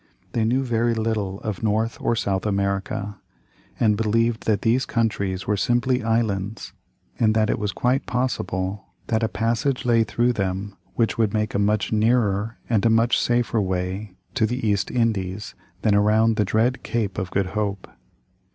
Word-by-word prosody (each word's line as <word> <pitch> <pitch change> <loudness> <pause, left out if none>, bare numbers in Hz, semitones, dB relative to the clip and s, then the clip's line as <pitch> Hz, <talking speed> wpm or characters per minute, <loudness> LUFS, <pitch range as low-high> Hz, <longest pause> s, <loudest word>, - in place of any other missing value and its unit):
They 115 -2 0
knew 130 +4 +2
very 120 -1 +1
little 110 -3 -1
of 105 -4 -4
North 110 +1 0
or 115 - +1
South 100 -2 -1
America, 100 0 -2 0.6
and 110 -3 +3
believed 115 +2 0
that 105 -2 +1
these 120 +4 +3
countries 100 -6 -1
were 105 - +1
simply 120 +4 +1
islands 110 -3 -1 0.5
and 110 -2 +3
that 110 0 +3
it - - -1
was 105 -1 -1
quite 125 +6 0
possible 95 -6 -2 0.2
that 110 0 +1
a 110 - +2
passage 115 +5 -1
lay 115 -2 +4
through 120 +3 +1
them 100 -1 -3 0.2
which 115 -1 0
would 110 -1 +2
make 110 0 0
a - - 0
much 105 +1 +1
nearer 110 -1 +1
and 110 -4 +1
a 115 - +4
much 115 +2 +3
safer 120 -2 +1
way 95 +1 -3 0.2
to 110 -4 +2
the 125 0 -2
East 100 -2 +1
Indies 105 -4 -1 0.3
than 105 - +3
around 110 +2 +4
the 105 - +1
dread 115 +6 +1
Cape 105 -5 -2
of 95 -2 -3
Good 95 -1 0
Hope. 100 -3 -2
110 Hz, 170 wpm, -23 LUFS, 100-115 Hz, 0.6 s, lay